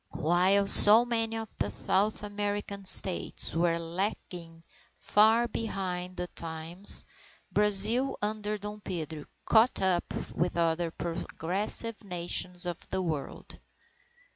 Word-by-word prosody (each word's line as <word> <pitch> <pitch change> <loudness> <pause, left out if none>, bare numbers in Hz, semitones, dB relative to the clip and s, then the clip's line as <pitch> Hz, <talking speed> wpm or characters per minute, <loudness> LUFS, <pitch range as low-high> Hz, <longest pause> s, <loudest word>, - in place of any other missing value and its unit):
While 185 +5 +2
so 215 +4 +8
many 225 -2 -2
of 225 -1 -9
the 100 - -2
South 195 - -2
American 205 -1 -6
States 185 -1 +7
were 170 0 -1
lagging 170 -1 -7 0.3
far 220 +3 +1
behind 185 -5 -6
the 180 - -4
times, 165 +2 -3 0.5
Brazil, 210 +6 +2
under 210 0 -4
Dom 210 +1 -9
Pedro, 160 -6 -7 0.2
caught 230 +2 +2
up 185 -2 -2 0.2
with 175 +1 -3
other 165 0 -1
progressive 180 +7 -4
Nations 180 -1 -3
of 175 -1 -6
the 190 0 -3
World. 155 -5 -7
190 Hz, 115 wpm, -27 LUFS, 170-210 Hz, 0.5 s, so